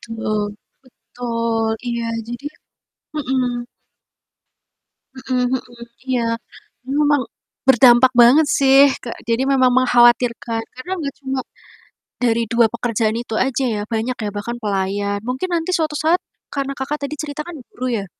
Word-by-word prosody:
Betul 215 -1 -1 0.6
betul 230 -2 -2 0.2
iya 235 -1 -2 0.2
jadi 240 +3 -7
ya - - -26 0.6
mhm. 250 -3 -1 1.5
Mhm 255 -1 -1
mhm, 240 -2 -6 0.3
iya, 245 -2 +1 0.7
memang, 290 -2 +3 0.5
berdampak 250 0 +7
banget 285 +6 +6
sih 270 0 +6 0.2
ke 235 - -5 0.2
jadi 230 +3 +1
memang 255 -1 +4
mengkhawatirkan 240 -2 +3
karena 255 +9 -8
enggak 285 -3 -4
cuma, 265 -1 -3 0.8
dari 230 -1 +2
2 235 -1 +5
pekerjaan 230 -2 0
itu 225 - -6
aja 270 0 -1
ya, 205 - -3
banyak 235 +3 -1
ya, 205 - -2
bahkan 235 +4 -4
pelayan 200 0 -1
mungkin 260 +9 -2
nanti 330 +2 -1
suatu 310 -2 -1
saat, 325 +4 +2 0.3
karena 275 -1 -2
Kakak 290 +3 -3
tadi 290 - -4
cerita 295 -1 -5
kan 345 -2 -8 0.2
guru 255 - -4
ya, - - -6
245 Hz, 135 wpm, -20 LUFS, 230-270 Hz, 1.5 s, berdampak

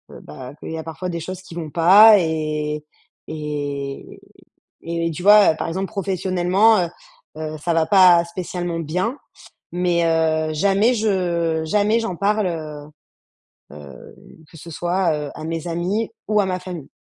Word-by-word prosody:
heu, - - -12
bah, 75 - -10
qu'il - - -8
y 160 - -4
a 160 - -6
parfois 165 +3 -6
des 170 -1 -4
choses 185 +3 -7
qui 170 - -13
vont 160 -3 -5
pas 195 +7 +7
et 155 -2 -2 0.4
et 145 -3 -5 0.6
et 165 0 -2
tu 165 +3 -7
vois? 205 -4 +7
Heu, - - -11
par - - -3
exemple, 190 +3 -3
professionnellement, 190 +2 +1
heu - - -7 0.5
heu, 155 0 -5
ça 170 +2 -1
va 165 -1 +2
pas 180 -3 +6
spécialement 175 -1 -5
bien 180 - -2 0.6
mais, 175 -1 +1
heu, 160 -1 +1
jamais 200 +8 +2
je 175 -7 0
jamais 210 +7 +2
j'en 190 -6 -4
parle, 210 +1 +1
heu 155 -3 -6 0.9
heu, 75 -2 -12 0.4
que 165 - -15
ce 165 +2 -11
soit, 175 +1 0 0.2
heu, - - -9
à - - -8
mes 165 0 -4
amis 185 +7 -2 0.2
ou 210 -1 +3
à 195 - 0
ma 185 -1 -2
famille. 175 -6 -8
170 Hz, 165 wpm, -21 LUFS, 155-190 Hz, 0.9 s, pas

